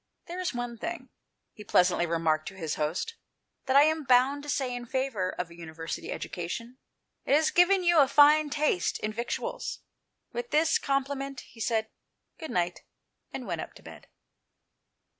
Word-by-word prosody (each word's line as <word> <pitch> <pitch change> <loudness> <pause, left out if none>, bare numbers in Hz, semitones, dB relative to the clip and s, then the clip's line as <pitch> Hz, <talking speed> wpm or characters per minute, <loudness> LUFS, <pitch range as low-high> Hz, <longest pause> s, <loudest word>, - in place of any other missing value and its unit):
" - - -52
There 350 +2 -6
is 365 - -1
one 245 -1 -5
thing," 340 +6 -5 0.4
he 210 - -11
pleasantly 180 -3 +3
remarked 160 -2 0
to 195 - -7
his 160 -5 -3
host, 160 - -2 0.5
"that 260 - +2
I 280 - +9
am 315 0 +1
bound 260 +3 +4
to 295 - -9
say 260 -3 -1
in 245 -1 -6
favour 245 -8 -1
of 180 -2 -5
a - - -12
University 160 -1 -6
education; 230 +9 -5 0.4
it 280 - +3
has 310 +1 +3
given 365 +2 +4
you 345 -2 +5
a 280 - +6
fine 295 +2 +6
taste 290 - +1
in 215 0 -3
victuals." 235 +2 -4 0.5
With 485 0 -4
this 320 +2 +3
compliment, 275 -1 -2
he 230 - -17
said 220 -1 0 0.2
" - - -48
good 320 -2 -6
night," 175 -1 -1 0.5
and - - -6
went - - -3
up - - -9
to - - -15
bed. - - -12
255 Hz, 180 wpm, -28 LUFS, 185-295 Hz, 0.5 s, I